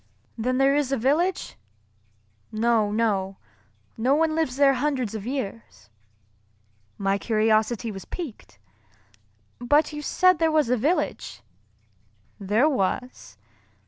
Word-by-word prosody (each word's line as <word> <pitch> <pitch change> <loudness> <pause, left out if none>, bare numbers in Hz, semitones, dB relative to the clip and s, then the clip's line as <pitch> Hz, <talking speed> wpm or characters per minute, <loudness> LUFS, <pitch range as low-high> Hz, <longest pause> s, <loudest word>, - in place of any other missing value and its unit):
"Then 250 +3 -1
there 270 +1 +3
is 290 -2 0
a 275 - +1
village?" 310 +10 0 0.9
"No, 220 -1 +1
no. 200 -3 -1 0.6
No 255 +5 +2
one 320 +1 +1
lives 315 -6 -1
there 275 0 +4
hundreds 260 -6 -1
of 215 0 -6
years." 220 - -6 1.1
My 195 0 0
curiosity 220 +1 +1
was 195 -2 -9
piqued, 300 - -8 1.0
"But 290 +5 +2
you 295 - -5
said 365 +3 +3
there 325 -1 +2
was 305 -6 +2
a - - +4
village." 285 - -2 1.0
"There 210 +8 +2
was." 250 - -3
250 Hz, 115 wpm, -24 LUFS, 215-290 Hz, 1.1 s, there